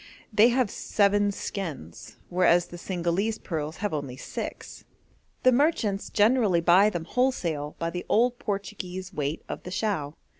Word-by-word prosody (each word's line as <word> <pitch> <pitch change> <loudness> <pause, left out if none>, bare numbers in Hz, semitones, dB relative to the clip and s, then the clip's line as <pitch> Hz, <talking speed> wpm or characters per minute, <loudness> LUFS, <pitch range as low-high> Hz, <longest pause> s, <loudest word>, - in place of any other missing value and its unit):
They 210 +2 +7
have 245 -3 +1
seven 205 0 +2
skins, 160 - -6
whereas 175 -1 +4
the 175 - -10
Cingalese 185 +5 -1
pearls 155 -1 -4
have 205 - -1
only 140 -4 -4
six. - - -7 0.6
The 255 - +6
merchants 240 -8 +1
generally 210 -4 +3
buy 180 +5 +5
them 175 -5 -4
wholesale 170 - -1
by 165 0 -2
the 180 0 -6
old 245 +2 +3
Portuguese 195 -3 -5
weight 145 -1 -3
of - - -5
the - - -8
chao. 180 -7 -2
190 Hz, 145 wpm, -27 LUFS, 170-210 Hz, 0.6 s, They